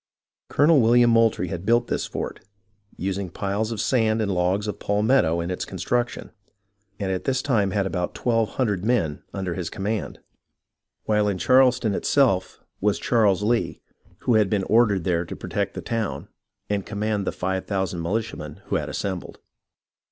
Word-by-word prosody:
Colonel 145 Hz, 0 st, +5 dB
William 120 Hz, +1 st, +5 dB
Moultrie 115 Hz, -6 st, +3 dB
had 85 Hz, +1 st, -5 dB
built 120 Hz, +3 st, +3 dB
this -, -, -2 dB
fort, -, -, -5 dB, 0.6 s
using 95 Hz, 0 st, -3 dB
piles 100 Hz, +5 st, -2 dB
of 110 Hz, -, -4 dB
sand 110 Hz, -3 st, +2 dB
and 100 Hz, -3 st, 0 dB
logs 90 Hz, +3 st, +1 dB
of 105 Hz, -, -4 dB
palmetto 105 Hz, -5 st, +2 dB
in 85 Hz, +2 st, -3 dB
its 90 Hz, -, -3 dB
construction, 120 Hz, -1 st, -2 dB, 0.7 s
and 95 Hz, -2 st, -1 dB
at 95 Hz, -, -3 dB
this 130 Hz, -1 st, 0 dB
time 110 Hz, -8 st, +2 dB
had 100 Hz, +1 st, 0 dB
about 90 Hz, -2 st, -2 dB
twelve 115 Hz, -4 st, 0 dB
hundred 105 Hz, -8 st, 0 dB
men 105 Hz, -11 st, 0 dB
under 95 Hz, -3 st, -3 dB
his 85 Hz, -2 st, -4 dB
com 95 Hz, -, -7 dB
mand, 105 Hz, +1 st, -2 dB, 0.8 s
while 105 Hz, -1 st, +2 dB
in 100 Hz, -2 st, 0 dB
Charleston 125 Hz, -1 st, +4 dB
itself 110 Hz, -6 st, +1 dB, 0.2 s
was 105 Hz, +1 st, +1 dB
Charles 105 Hz, -5 st, +2 dB
Lee, 115 Hz, +2 st, 0 dB, 0.4 s
who 120 Hz, -, +2 dB
had 105 Hz, -3 st, +4 dB
been 100 Hz, -2 st, +1 dB
ordered 105 Hz, -5 st, +3 dB
there 85 Hz, -1 st, +1 dB
to 85 Hz, -, -7 dB
protect -, -, -3 dB
the -, -, -4 dB
town, 115 Hz, -2 st, -3 dB, 0.4 s
and 100 Hz, -1 st, -1 dB
command 105 Hz, -1 st, -2 dB
the -, -, +1 dB
five 95 Hz, +1 st, -3 dB
thousand 95 Hz, -4 st, -2 dB
militiamen 110 Hz, +7 st, -4 dB
who -, -, 0 dB
had -, -, -4 dB
assembled. 95 Hz, -3 st, -4 dB
105 Hz, 165 wpm, -24 LUFS, 95-115 Hz, 0.8 s, Colonel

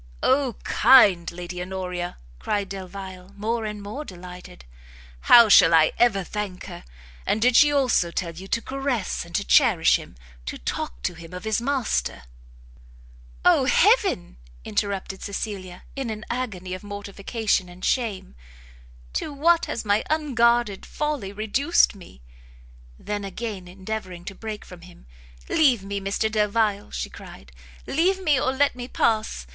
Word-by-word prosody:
"O 265 Hz, -2 st, +2 dB
kind 205 Hz, -8 st, +5 dB
Lady 180 Hz, +1 st, -7 dB
Honoria!" 180 Hz, -1 st, -4 dB, 0.2 s
cried 205 Hz, -2 st, -2 dB
Delvile, 190 Hz, 0 st, -8 dB
more 225 Hz, +2 st, -2 dB
and 210 Hz, -1 st, -5 dB
more 215 Hz, +9 st, -6 dB
delighted, 180 Hz, -, -11 dB, 0.6 s
"how 235 Hz, -2 st, +9 dB
shall 175 Hz, -5 st, +7 dB
I 160 Hz, -1 st, +5 dB
ever 215 Hz, -5 st, +3 dB
thank 200 Hz, -1 st, -5 dB
her! -, -, -9 dB, 0.4 s
And 215 Hz, -, 0 dB
did 245 Hz, +2 st, +3 dB
she 295 Hz, +2 st, +7 dB
also 260 Hz, -11 st, +2 dB
tell 170 Hz, 0 st, -3 dB
you 185 Hz, +4 st, -10 dB
to 230 Hz, +3 st, -1 dB
caress 265 Hz, -10 st, -2 dB
and 170 Hz, 0 st, -9 dB
to 200 Hz, -, +1 dB
cherish 225 Hz, -, +5 dB
him? -, -, -12 dB, 0.3 s
to -, -, -4 dB
talk -, -, -5 dB
to -, -, -1 dB
him 165 Hz, 0 st, -12 dB
of 180 Hz, -, -7 dB
his 220 Hz, +1 st, 0 dB
master 255 Hz, -, -1 dB, 0.6 s
" -, -, -23 dB
"O -, -, +5 dB
heaven!" -, -, +3 dB, 0.3 s
interrupted 195 Hz, -, -3 dB
Cecilia, 195 Hz, -3 st, -5 dB
in 270 Hz, -4 st, -3 dB
an 215 Hz, 0 st, -6 dB
agony 200 Hz, -8 st, -4 dB
of 185 Hz, -, -6 dB
mortification 205 Hz, 0 st, -2 dB
and 180 Hz, +1 st, -8 dB
shame, 220 Hz, -, -1 dB, 0.8 s
"to -, -, -3 dB
what 330 Hz, +4 st, +3 dB
has 230 Hz, -, -4 dB
my 205 Hz, +1 st, +2 dB
unguarded 240 Hz, -8 st, +2 dB
folly 295 Hz, -10 st, -3 dB
reduced 220 Hz, +10 st, +2 dB
me!" 175 Hz, -, -15 dB, 0.7 s
Then 205 Hz, -1 st, -4 dB
again 195 Hz, -1 st, -6 dB
endeavouring 185 Hz, -1 st, -6 dB
to 195 Hz, -, -6 dB
break 215 Hz, +1 st, -7 dB
from 180 Hz, -2 st, -12 dB
him, 180 Hz, 0 st, -16 dB, 0.4 s
"Leave 255 Hz, -10 st, +3 dB
me, 200 Hz, 0 st, -4 dB
Mr 200 Hz, +3 st, -1 dB
Delvile," 210 Hz, -1 st, +1 dB
she 60 Hz, -, -5 dB
cried, 65 Hz, -2 st, -12 dB, 0.3 s
"leave 365 Hz, +6 st, +1 dB
me, 305 Hz, -8 st, +2 dB
or 260 Hz, -, +1 dB
let 280 Hz, +1 st, +1 dB
me 245 Hz, 0 st, -6 dB
pass! 215 Hz, -, 0 dB
205 Hz, 150 wpm, -24 LUFS, 180-235 Hz, 0.8 s, how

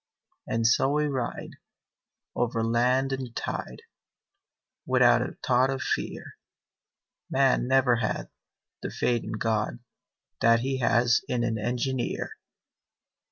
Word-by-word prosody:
And 115 Hz, 0 st, -1 dB
so 125 Hz, +3 st, +4 dB
we 150 Hz, +1 st, +1 dB
ride 130 Hz, -5 st, -4 dB, 0.8 s
Over 115 Hz, -2 st, 0 dB
land 125 Hz, +4 st, +2 dB
and 130 Hz, -3 st, -5 dB
tide, 60 Hz, -, -5 dB, 1.0 s
Without -, -, +5 dB
a -, -, -4 dB
thought 130 Hz, +1 st, +3 dB
of 135 Hz, -2 st, -2 dB
fear -, -, -4 dB, 0.9 s
_Man 135 Hz, -2 st, +3 dB
never 130 Hz, -2 st, +4 dB
had 110 Hz, -2 st, -3 dB, 0.5 s
The -, -, -4 dB
faith 120 Hz, -2 st, 0 dB
in -, -, -5 dB
God 110 Hz, -, -1 dB, 0.6 s
That 115 Hz, 0 st, +4 dB
he 135 Hz, +1 st, -2 dB
has 120 Hz, -1 st, +3 dB
in 120 Hz, -1 st, -1 dB
an 115 Hz, -2 st, -1 dB
engineer! 125 Hz, +3 st, -2 dB
120 Hz, 115 wpm, -27 LUFS, 115-130 Hz, 1.0 s, Without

